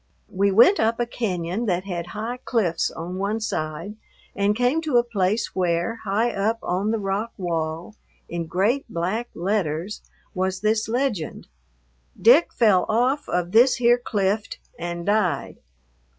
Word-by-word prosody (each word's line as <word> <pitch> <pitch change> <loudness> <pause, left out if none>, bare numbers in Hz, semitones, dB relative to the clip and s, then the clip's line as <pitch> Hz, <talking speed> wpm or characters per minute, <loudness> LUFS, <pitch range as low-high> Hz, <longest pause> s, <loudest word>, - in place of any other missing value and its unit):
We 200 +2 +2
went 235 - +6
up 225 +1 +1
a 240 - +1
cañon 200 -2 -3
that 180 -1 0
had 175 -3 -4
high 225 +7 -5
cliffs 185 -9 0
on 175 +3 -6
one 205 +3 -1
side, 170 0 -4 0.4
and 200 +1 +1
came 250 +7 +1
to 300 -6 +1
a 240 - +5
place 210 -2 -1
where, 180 +4 0
high 220 +4 +1
up 215 +3 0
on 190 +4 -1
the 225 - +1
rock 205 +2 -2
wall, 165 0 -3 0.3
in 170 -1 -4
great 215 - +1
black 215 +6 -2
letters, 180 0 -2 0.3
was 185 -1 -2
this 215 +1 +1
legend: 230 - -2 0.7
"Dick 260 +9 +6
fell 210 -6 +3
off 250 +6 +1
of 175 0 -1
this 240 +5 +6
here 240 0 +3
clift 205 -1 -1 0.2
and 170 0 -4
died." 205 -3 0
205 Hz, 150 wpm, -23 LUFS, 180-230 Hz, 0.7 s, went